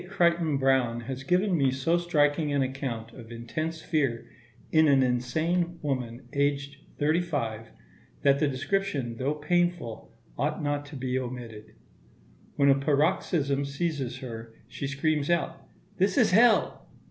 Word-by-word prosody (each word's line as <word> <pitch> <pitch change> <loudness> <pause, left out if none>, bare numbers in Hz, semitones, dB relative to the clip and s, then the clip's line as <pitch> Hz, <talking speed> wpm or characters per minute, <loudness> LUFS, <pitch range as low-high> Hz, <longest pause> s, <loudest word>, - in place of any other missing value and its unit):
Crichton 170 -5 +2
Browne 130 -3 +2
has 130 +2 -6
given 180 +4 +2
me 140 -4 +3
so 135 +7 +1
striking 150 -3 +1
an 140 -1 +2
account 130 -4 -4
of 120 -2 -12
intense 155 +8 -4
fear 135 -8 -1 0.4
in 155 0 +5
an 135 -2 +5
insane 160 +8 0
woman, 125 -3 -3
aged 140 0 0 0.2
thirty 155 +4 +2
five, 115 -10 -3 0.6
that 140 0 +4
the 150 - +2
description 140 -3 -2
though 140 +4 -1
painful 175 -6 -1 0.3
ought 150 +2 -1
not 145 0 -1
to 145 - -10
be 130 -1 -1
omitted. 115 -4 -8 0.8
When 140 -1 +4
a 135 - +3
paroxysm 145 -1 +1
seizes 140 -3 -3
her, 115 -2 -8
she 140 - -5
screams 145 +1 0
out, 170 -1 -1 0.3
"This 195 +8 +1
is 240 -8 +4
hell!" 225 +4 +4
140 Hz, 140 wpm, -27 LUFS, 130-165 Hz, 0.8 s, in